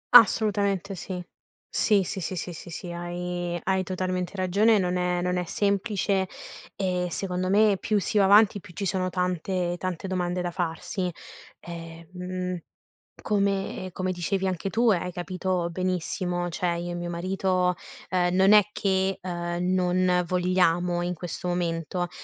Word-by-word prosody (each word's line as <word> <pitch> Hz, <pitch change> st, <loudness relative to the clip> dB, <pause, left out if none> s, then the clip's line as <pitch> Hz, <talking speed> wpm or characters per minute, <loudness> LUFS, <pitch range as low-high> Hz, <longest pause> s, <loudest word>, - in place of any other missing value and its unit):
Assolutamente 200 Hz, -3 st, +5 dB
sì. 180 Hz, -1 st, -5 dB, 0.5 s
Sì, 205 Hz, -3 st, +4 dB
sì, 190 Hz, -, -4 dB
sì, 185 Hz, +1 st, -3 dB
sì, 175 Hz, 0 st, -4 dB
sì, 170 Hz, -, -10 dB
sì, 175 Hz, +1 st, -6 dB
hai 175 Hz, 0 st, -3 dB
hai 190 Hz, 0 st, +1 dB
totalmente 185 Hz, 0 st, -2 dB
ragione 200 Hz, +4 st, +3 dB
e -, -, +5 dB
non 180 Hz, -2 st, 0 dB
è 180 Hz, 0 st, 0 dB
non 180 Hz, 0 st, 0 dB
è 180 Hz, -, 0 dB
semplice; 200 Hz, +1 st, 0 dB, 0.5 s
ehm, 180 Hz, -2 st, 0 dB
secondo 180 Hz, +1 st, -2 dB
me, 205 Hz, 0 st, +5 dB
più 210 Hz, -1 st, +1 dB
si 210 Hz, +2 st, +1 dB
va 195 Hz, -, +5 dB
avanti, 205 Hz, +1 st, +6 dB
più 185 Hz, -2 st, -14 dB
ci 200 Hz, -, -3 dB
sono 185 Hz, 0 st, 0 dB
tante 180 Hz, 0 st, -1 dB
tante 185 Hz, 0 st, -3 dB
domande 180 Hz, -1 st, -1 dB
da 175 Hz, -, -2 dB
farsi. 175 Hz, +1 st, -2 dB, 0.5 s
Ehm, 165 Hz, -1 st, -8 dB
mhmm, 180 Hz, 0 st, -3 dB, 0.7 s
come 195 Hz, -2 st, 0 dB
come 185 Hz, +1 st, -2 dB
dicevi 185 Hz, +2 st, -1 dB
anche 185 Hz, +1 st, -2 dB
tu, 230 Hz, +2 st, +3 dB
e 190 Hz, -, +3 dB
hai 180 Hz, +1 st, -4 dB
capito 180 Hz, 0 st, -2 dB
benissimo, 180 Hz, 0 st, -1 dB
cioè, 170 Hz, 0 st, -1 dB
io 175 Hz, +1 st, -4 dB
e -, -, -4 dB
mio 175 Hz, 0 st, -4 dB
marito, 185 Hz, +1 st, +1 dB, 0.4 s
ehm, 180 Hz, 0 st, +2 dB
non 190 Hz, +2 st, +5 dB
è 210 Hz, -1 st, +7 dB
che, 190 Hz, -1 st, +1 dB
ehm, 175 Hz, 0 st, -2 dB
non 180 Hz, -1 st, +2 dB
vogliamo, 180 Hz, -1 st, +2 dB
in 180 Hz, +1 st, -1 dB
questo 175 Hz, +1 st, -6 dB
momento; 175 Hz, 0 st, -1 dB
180 Hz, 160 wpm, -26 LUFS, 175-190 Hz, 0.7 s, è